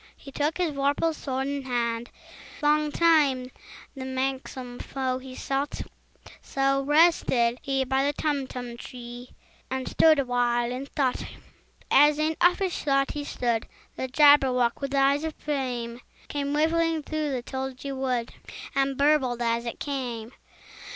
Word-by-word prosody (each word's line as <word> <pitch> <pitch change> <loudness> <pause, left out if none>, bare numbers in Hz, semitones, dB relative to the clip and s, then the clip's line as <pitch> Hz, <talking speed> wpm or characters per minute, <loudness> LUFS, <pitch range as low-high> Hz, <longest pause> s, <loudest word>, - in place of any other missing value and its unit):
He 275 - -12
took 295 +3 -1
his 355 -3 0
vorpal 285 +3 +1
sword 265 -3 -3
in 280 0 -2
hand: 240 -2 -2 0.5
Long 300 0 +3
time 285 -6 +3 0.4
the 265 - -6
manxome 260 -1 -4
foe 260 -1 -2
he 260 0 -10
sought 275 +2 -2 0.6
So 275 0 +1
rested 275 -5 +3
he 270 -1 0
by 265 +1 +1
the 285 - +2
Tumtum 260 -5 -3
tree, 245 0 -9 0.4
And 260 0 -3
stood 315 -1 +5
awhile 245 -2 +1
in 260 +2 -5
thought. 265 -3 0
And, - - -10 0.5
as 295 +2 +6
in 310 +1 0
uffish 355 +1 +2
thought 275 -1 +2
he 295 - -4
stood, 235 -5 -1 0.3
The 260 - -3
Jabberwock, 260 -4 +4
with 275 0 -2
eyes 275 +2 +3
of 320 -1 -3
flame, 250 -5 -3 0.3
Came 285 0 -2
whiffling 325 +1 +1
through 305 -1 -2
the 250 -2 -3
tulgey 265 +1 -5
wood, 255 -3 -2 0.4
And 275 -1 +1
burbled 280 -4 +3
as 235 0 0
it 235 - -5
came! 245 -5 -4
270 Hz, 145 wpm, -26 LUFS, 250-290 Hz, 0.6 s, as